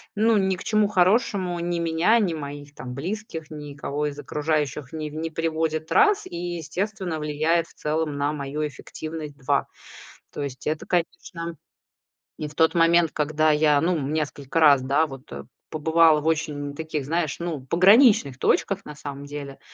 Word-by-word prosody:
ну, 220 +1 +3
ни 190 -1 +1
к - - -9
чему 215 -1 +2
хорошему 185 -2 +2
ни 170 0 -2
меня, 170 +7 +3
ни 185 -6 +1
моих 145 -1 -7
там 125 -1 -7
близких, 165 +1 -5
никого 150 0 -4
из 145 0 -6
окружающих 150 -2 -2
не 155 -1 -4
в - - -11
не 165 +1 -3
приводит- 160 -1 -2
раз. 420 -1 +4
И, - - -8
естественно, 175 +1 -3
влияет 155 +3 0
в - - -20
целом 150 -1 -2
на 145 +1 0
мою 150 +1 -3
эффективность- 155 0 -8
2. 135 - 0 0.7
То 145 - -4
есть 130 -1 -6
это, 155 0 -2
конечно 170 -1 -3 0.8
и 150 - -3
в 150 - -13
тот 160 +1 +4
момент, 165 -1 +4
когда 155 +1 +1
я, 150 -1 +4
ну, 175 0 +1
несколько 145 +1 -2
раз, 145 -4 +6
да, 140 +5 +2
вот, 135 0 -11
э, - - -7 0.3
побывала 160 0 +4
в - - -10
очень 150 -3 -1
таких, 155 -3 -4
знаешь, 160 -1 -1
ну, 165 -5 -3
пограничных 185 - +5
точках, 195 0 +1
на 150 - -9
самом 145 -1 -7
деле. 140 -1 -7
155 Hz, 165 wpm, -24 LUFS, 145-170 Hz, 0.8 s, раз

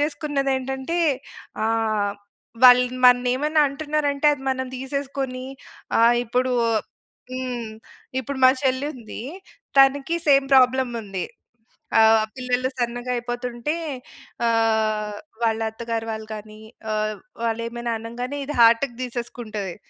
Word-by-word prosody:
చేసుకున్నది 290 -2 -1
ఏంటంటే 265 +5 -3 0.7
ఆహ్, 220 -2 +1 0.5
వాళ్ళు 250 0 +9 0.2
మన్ని 250 0 +6
ఏమైనా 300 +3 +1
అంటున్నారంటే 290 0 -1
అది 275 -2 -5
మనం 260 0 -1
తీసేసుకొని 265 -1 -4 0.5
ఆహ్, 235 +1 +5
ఇప్పుడు 250 +2 0 0.8
హ్మ్, 250 -3 -4 0.5
ఇప్పుడు 270 +2 -5
మా 255 - +9
చెల్లి 260 +1 +1
ఉంది. 230 -2 -8 0.6
తనకి 275 +3 +4
సేమ్ 275 -2 +5
ప్రాబ్లమ్ 260 -1 +4
ఉంది. 195 -3 -4 0.8
ఆహ్, 220 0 +6
పిల్లలు 255 0 -1
సన్నగా 245 0 -2
అయిపోతుంటే 240 +3 -3 0.7
ఆహ్, 220 -2 +1 0.3
వాళ్ళ 225 -1 +2
అత్తగారు 230 0 -4
వాళ్ళు 220 0 -6
గాని 215 0 -10 0.3
ఆహ్, 215 0 -1 0.3
వాళ్ళు 230 0 -1
ఏమైనా 235 0 -4
అనంగానే 245 +5 -5
ఇది 295 - -5
హార్ట్‌కి 235 +2 +5
తీసేసుకుంటది. 230 -6 -5
245 Hz, 110 wpm, -23 LUFS, 225-265 Hz, 0.8 s, వాళ్ళు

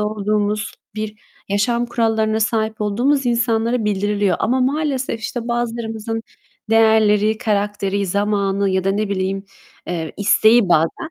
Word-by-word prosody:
olduğumuz, 210 0 -1 0.2
bir 215 0 -5 0.3
yaşam 235 +4 +1
kurallarına 225 -2 0
sahip 220 0 -1
olduğumuz 250 +7 +1
insanlara 235 -1 +1
bildiriliyor 205 -1 0
ama 255 +3 +1
maalesef, 270 -3 -1
işte, 235 +1 -5
bazılarımızın 225 -2 -3 0.5
değerleri, 220 -1 +4
karakteri, 205 -3 -1
zamanı 200 0 0
ya 190 0 0
da 195 - +2
ne 210 +1 -1
bileyim, 195 0 -2 0.4
eee, 165 -3 -4
isteği 220 +1 +4
bazen 170 - +1
215 Hz, 120 wpm, -19 LUFS, 200-230 Hz, 0.5 s, değerleri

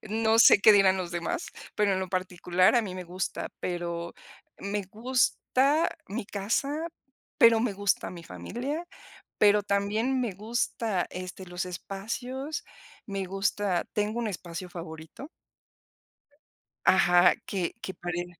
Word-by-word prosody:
no 220 +1 +1
sé 230 - +9
qué 215 - +8
dirán 195 -2 +5
los 180 -2 -4
demás, 170 -1 -3 0.3
pero 210 -1 +2
en 190 - 0
lo 190 - -3
particular, 185 +1 +2
a 235 - +4
mí 190 -4 -5
me 185 -1 -6
gusta, 180 +2 -4
pero 170 -1 -3 0.4
me 200 +1 -2
gusta 260 +6 +2 0.2
mi 210 +3 -4
casa, 275 +11 -1 0.5
pero 230 -1 +7
me 230 -2 0
gusta 200 -1 0
mi 170 -2 -10
familia, 245 - -5 0.5
pero 205 0 +5
también 210 +6 0
me 235 -5 -2
gusta, 215 -1 -1
este, 185 +1 -7
los 180 0 -4
espacios, 245 - -5 0.4
me 195 -2 -3
gusta 195 -1 0
tengo 210 +2 -1
un 235 - -1
espacio 180 -2 -6
favorito. 165 - -9 1.6
Ajá, 180 -1 +6
que 185 -4 -2
que 190 - -5
pare 175 0 -4
195 Hz, 135 wpm, -28 LUFS, 180-225 Hz, 1.6 s, sé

